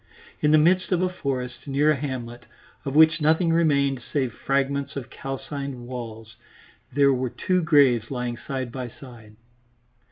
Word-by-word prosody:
In 150 - +2
the 155 - +6
midst 180 +5 +3
of 180 0 +2
a 185 - +1
forest, 130 -8 -4
near 145 +2 +3
a - - +2
hamlet, 120 -4 -6 0.4
of 135 0 -3
which 160 +1 +6
nothing 160 +2 +3
remained 140 -5 +2
save 130 -2 -2
fragments 140 +2 -1
of 135 -4 -6
calcined 135 -1 -6
walls, 115 -3 -8 0.5
there 140 +1 +4
were 130 0 -1
two 185 +8 0
graves 140 -8 +4
lying 125 -2 -3
side 130 0 -5
by 125 0 -5
side. 115 -4 -14
135 Hz, 155 wpm, -24 LUFS, 125-150 Hz, 0.5 s, the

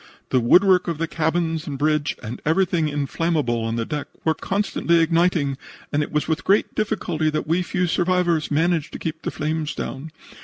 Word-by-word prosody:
The 130 - +3
woodwork 180 +9 +5
of 170 -3 -2
the 165 +1 -1
cabins 160 0 -1
and 140 -2 -4
bridge 150 0 +1
and 115 +3 -6
everything 165 -1 +1
inflammable 145 -4 -1
on 115 0 -2
deck 130 +6 -3 0.2
were 160 - +3
constantly 180 -1 0
igniting, 165 -4 +2 0.3
and 145 - +2
it 150 - -3
was 150 -1 0
with 160 +3 -1
great 200 +2 +2
difficulty 180 -7 -1
that 155 0 -2
we 165 +3 +1
few 180 0 -1
survivors 175 -2 +1
managed 160 +1 +1
to - - -4
keep 160 0 -5
the - - -3
flames 155 0 -2
down. 135 +4 -5
160 Hz, 180 wpm, -22 LUFS, 150-175 Hz, 0.3 s, woodwork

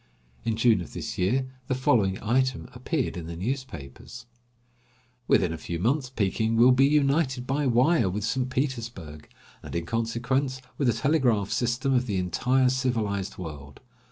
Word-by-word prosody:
In 115 -1 0
June 115 -3 +3
of 85 - -9
this - - -5
year 120 +9 +1 0.2
the 130 - 0
following 105 -7 +2
item 130 +3 0
appeared 130 +2 -2
in 85 -2 -6
the 85 - -6
newspapers: 115 - -6 1.0
"Within 90 -3 +3
a 80 - -6
few 85 - -4
months 125 - 0
Peking 110 -1 0
will 120 +3 +6
be 135 +2 +5
united 140 -3 +1
by 140 +2 0
wire 125 - +3
with 100 +3 -3
St. 125 +4 -1
Petersburg; 115 - -4 0.3
and, - - -8
in 85 0 -2
consequence, 120 +5 -1 0.2
with 140 - +2
the 120 - +4
telegraph 120 -6 +1
system 125 +3 0
of 125 0 +1
the 100 -3 -1
entire 125 +9 +2
civilized 115 -7 -1
world. 75 -5 -8
120 Hz, 155 wpm, -26 LUFS, 100-130 Hz, 1.0 s, will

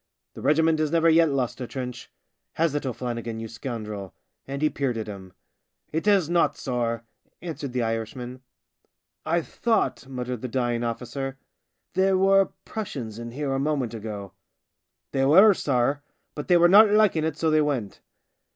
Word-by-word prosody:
The - - -10
regiment 160 +1 +3
has 155 -1 +1
never 165 +1 +4
yet 165 0 +5
lost 130 -2 -2
a 125 - -4
trench. 125 -2 -6 0.4
Has 165 -2 +1
it, 145 -2 -2
O'Flannigan, 120 -2 -4
you 115 - -5
scoundrel? 110 -5 -6
" - - -50
And 140 +2 -4
he 155 - +4
peered 130 -4 -1
at 110 - -3
him. 95 -3 -9 0.3
" - - -48
It 160 +6 -2
has 195 -6 +4
not, 170 0 +2
sorr," 120 -3 -2 0.4
answered 155 -5 -6
the 125 -1 -1
Irishman. 115 +3 -4 0.4
" - - -50
I 170 +1 +1
thought," 225 - -1
muttered 125 -2 -5
the 130 - -3
dying 120 -1 -1
officer, 125 +3 -4 0.3
" - - -53
there 190 +1 +3
were 195 0 +4 0.2
Prussians 125 - -5
in 120 0 -6
here 135 +2 -3
a 135 - 0
moment 140 -5 -1
ago." 105 -3 -6 0.4
" - - -58
They 135 - +1
were, 190 +10 +7
sorr, 140 -2 0 0.3
but 150 - -6
they 180 - +5
were 175 0 +6
not 205 +4 +8
liking 205 -6 +3
it, 160 -2 -2
so 160 -1 +1
they 155 0 +4
went." 130 -9 -2
135 Hz, 180 wpm, -25 LUFS, 120-160 Hz, 0.4 s, not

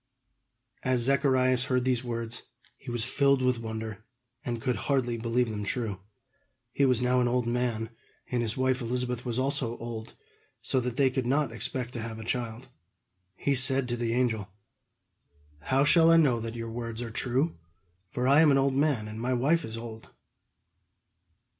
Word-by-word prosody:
As 130 -2 +1
Zacharias 130 -1 +3
heard 125 -1 0
these 130 -1 +1
words, 115 -1 -4 0.3
he - - -11
was 120 -2 -1
filled 140 0 +2
with 125 -2 +2
wonder, 110 -1 -6 0.4
and 120 -2 -3
could 125 +1 -1
hardly 130 -4 +1
believe 115 +1 0
them 105 -1 -4
true. 105 -3 -3 0.7
He 140 - +2
was 125 -2 +2
now 125 0 +3
an 125 - +2
old 125 0 +1
man, 120 -2 -1 0.4
and 125 -1 +1
his 115 0 -2
wife 130 0 +1
Elizabeth 125 +1 -2
was 120 -1 -2
also 130 -3 -1
old; 115 -1 -7 0.4
so 130 - 0
that 125 0 -3
they 135 -2 +4
could 130 -2 -2
not 140 +1 +1
expect 120 +2 -4
to 120 - -4
have 110 0 -6
a 110 - -7
child. 120 +1 -3 0.7
He 140 - 0
said 135 0 +4
to 120 - 0
the 115 -1 -1
angel: 110 -5 0 1.1
"How 130 - +2
shall 165 +2 +6
I 165 - +7
know 135 -8 +4
that 115 +1 -5
your 115 -1 -5
words 115 0 -5
are 115 - -6
true, 130 - 0 0.5
for 125 +5 -1
I 140 +3 +6
am 160 - +6
an 140 - +5
old 135 0 +2
man, 135 -6 +1
and 110 +1 -7
my 125 +2 0
wife 145 +7 +2
is 115 0 -6
old?" 115 -1 -9
125 Hz, 180 wpm, -28 LUFS, 115-130 Hz, 1.1 s, I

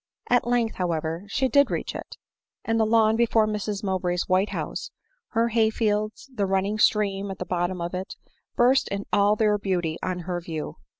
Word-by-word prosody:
At 245 -1 +3
length, 240 -2 +1
however, 165 0 -2
she 265 +6 0
did 280 +3 +4
reach - - -3
it; - - -8 0.2
— - - -50
and 225 0 +1
the 220 - +3
lawn 220 -1 +4
before 225 -1 +3
Mrs 210 -1 -3
Mowbray's 180 -2 -1
white 185 +3 +2
house, - - -4 0.4
her 230 +1 +2
hay 225 -1 +3
fields, 215 +3 -1
and 260 -2 -23
the 200 - +2
running 195 +3 0
stream 200 -2 +2
at 190 - -5
the 180 - -5
bottom 180 +1 -1
of 170 +1 -4
it, 185 +2 -5 0.4
burst 255 +3 +4
in 200 0 -4
all 205 +1 +4
their 210 -1 +2
beauty 175 -5 -1
on 180 -1 -2
her 175 0 -3
view. 160 -3 -5
205 Hz, 195 wpm, -25 LUFS, 185-225 Hz, 0.4 s, did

